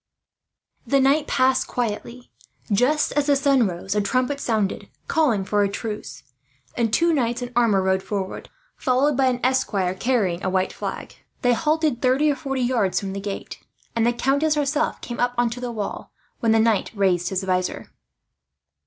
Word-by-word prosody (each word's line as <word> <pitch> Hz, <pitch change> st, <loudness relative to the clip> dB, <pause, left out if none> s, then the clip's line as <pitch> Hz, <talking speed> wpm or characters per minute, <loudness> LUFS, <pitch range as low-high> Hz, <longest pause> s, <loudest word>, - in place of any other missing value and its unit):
The 275 Hz, -, +3 dB
night 280 Hz, +3 st, +3 dB
passed 260 Hz, 0 st, +2 dB
quietly. 240 Hz, +1 st, -4 dB, 0.4 s
Just 255 Hz, +9 st, +2 dB
as 290 Hz, -1 st, 0 dB
the 285 Hz, -, +4 dB
sun 275 Hz, -4 st, +3 dB
rose 180 Hz, +2 st, -4 dB
a 210 Hz, -, +1 dB
trumpet 255 Hz, +7 st, 0 dB
sounded, 220 Hz, -7 st, -1 dB, 0.2 s
calling 250 Hz, -, +1 dB
for 205 Hz, +1 st, +1 dB
a 200 Hz, -, +2 dB
truce; 200 Hz, -, -6 dB, 0.5 s
and 230 Hz, -2 st, 0 dB
two 335 Hz, +7 st, +3 dB
knights 240 Hz, -4 st, 0 dB
in 245 Hz, -, -6 dB
armour 220 Hz, -6 st, +3 dB
rode 190 Hz, 0 st, +1 dB
forward, 195 Hz, -1 st, -5 dB, 0.3 s
followed 265 Hz, +3 st, +1 dB
by 265 Hz, 0 st, +3 dB
an 250 Hz, -1 st, 0 dB
esquire 205 Hz, -8 st, +1 dB
carrying 190 Hz, -4 st, 0 dB
a 190 Hz, -, 0 dB
white 185 Hz, 0 st, 0 dB
flag. -, -, -6 dB, 0.3 s
They 245 Hz, 0 st, +4 dB
halted 305 Hz, -2 st, 0 dB
thirty 270 Hz, +4 st, +3 dB
or -, -, -1 dB
forty 270 Hz, -3 st, -3 dB
yards 235 Hz, -7 st, +1 dB
from 195 Hz, -1 st, -5 dB
the 195 Hz, -, -5 dB
gate; 200 Hz, -1 st, -6 dB, 0.4 s
and 230 Hz, -, +2 dB
the 240 Hz, -, +3 dB
countess 280 Hz, +5 st, +1 dB
herself 295 Hz, +1 st, 0 dB
came 240 Hz, -, -6 dB
up 245 Hz, 0 st, +1 dB
on 240 Hz, -1 st, +2 dB
to 245 Hz, -, -6 dB
the 245 Hz, -1 st, -4 dB
wall, 210 Hz, -3 st, -5 dB, 0.3 s
when 230 Hz, -, +2 dB
the 225 Hz, -, +4 dB
knight 220 Hz, -2 st, +2 dB
raised 185 Hz, -3 st, +1 dB
his 190 Hz, 0 st, -2 dB
vizor. 185 Hz, -1 st, -2 dB
240 Hz, 180 wpm, -23 LUFS, 200-270 Hz, 0.5 s, the